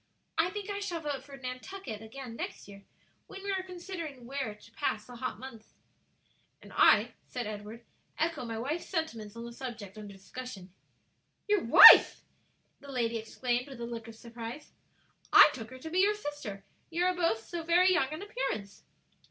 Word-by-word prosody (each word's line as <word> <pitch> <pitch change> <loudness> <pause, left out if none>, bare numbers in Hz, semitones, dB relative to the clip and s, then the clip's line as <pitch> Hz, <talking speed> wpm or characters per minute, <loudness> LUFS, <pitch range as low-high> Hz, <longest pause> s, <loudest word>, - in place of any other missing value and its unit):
I 325 +2 +2
think 410 +1 -6
I 405 - -3
shall 380 -4 -3
vote 295 -3 -4
for 280 -1 -12
Nantucket 255 - -7
again 235 +1 -9
next - - -6
year, 200 -1 -13 0.4
when 390 0 -10
we 400 - -2
are 380 -1 0
considering 345 -8 -8
where 265 -4 -4
to 210 +2 -19
pass 215 -1 -2
the 245 -1 -11
hot 255 - -4
months." 230 -4 -12 0.8
"And - - -15
I," - - +5 0.2
said 245 -2 -4
Edward, 215 +2 -8 0.3
"echo 325 -4 -1
my 230 -2 -5
wife's 290 +9 -3
sentiments 230 - -3
on 230 0 -7
the 235 - -8
subject 225 -5 -8
under 205 -1 -9
discussion." 195 -1 -10 0.7
"Your 415 -3 +2
wife" 230 - +10 0.6
the 280 - -11
lady 235 -3 -1
exclaimed, 245 +3 -2
with 270 -4 -10
a 235 - -4
look 230 -1 -7
of 225 - -10
surprise. 235 +4 -9 0.6
"I - - +9
took 225 -5 -8
her 260 - -10
to 320 +5 -9
be 360 - +1
your 410 +2 +4
sister; 290 - -7 0.3
you 345 +2 0
are 365 - +3
both 330 -11 0
so 345 +5 -5
very 355 +3 +4
young 285 -6 +1
in 310 +5 -6
appearance." 405 - -4
255 Hz, 180 wpm, -30 LUFS, 225-335 Hz, 0.8 s, wife